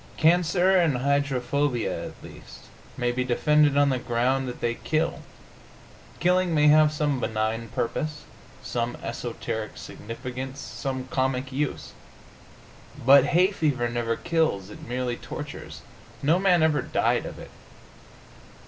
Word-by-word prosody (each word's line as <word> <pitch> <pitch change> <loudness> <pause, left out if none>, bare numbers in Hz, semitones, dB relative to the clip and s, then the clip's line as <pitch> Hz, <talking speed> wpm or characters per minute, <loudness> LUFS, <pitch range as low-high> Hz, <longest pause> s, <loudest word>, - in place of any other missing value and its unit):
Cancer 175 +3 +3
and 165 -8 +3
hydrophobia, 140 -1 0
at - - -13
least, - - -12 0.4
may 120 -1 0
be 125 +1 -1
defended 145 +3 +3
on 145 0 +4
the 130 -2 0
ground 125 +3 0
that 125 - -6
they 120 0 0
kill. 155 +6 -1 1.0
Killing 180 -1 +2
may 150 0 +5
have 155 0 +6
some 145 -3 0
benign 110 0 -2
purpose, 150 +7 -3 0.4
some 120 0 -2
esoteric 115 -2 -5
significance, 125 +4 -7
some 130 -2 -5
cosmic 130 0 -1
use. 140 +2 -3 1.1
But 135 0 +8
hay 180 +6 +3
fever 145 -10 0
never 120 -1 -1
kills; 160 - -1
it - - -11
merely 125 0 -2
tortures. - - -8 0.4
No 160 +6 +3
man 180 -4 +4
ever 155 -2 +3
died - - 0
of - - -8
it. - - -11
135 Hz, 130 wpm, -25 LUFS, 120-155 Hz, 1.1 s, But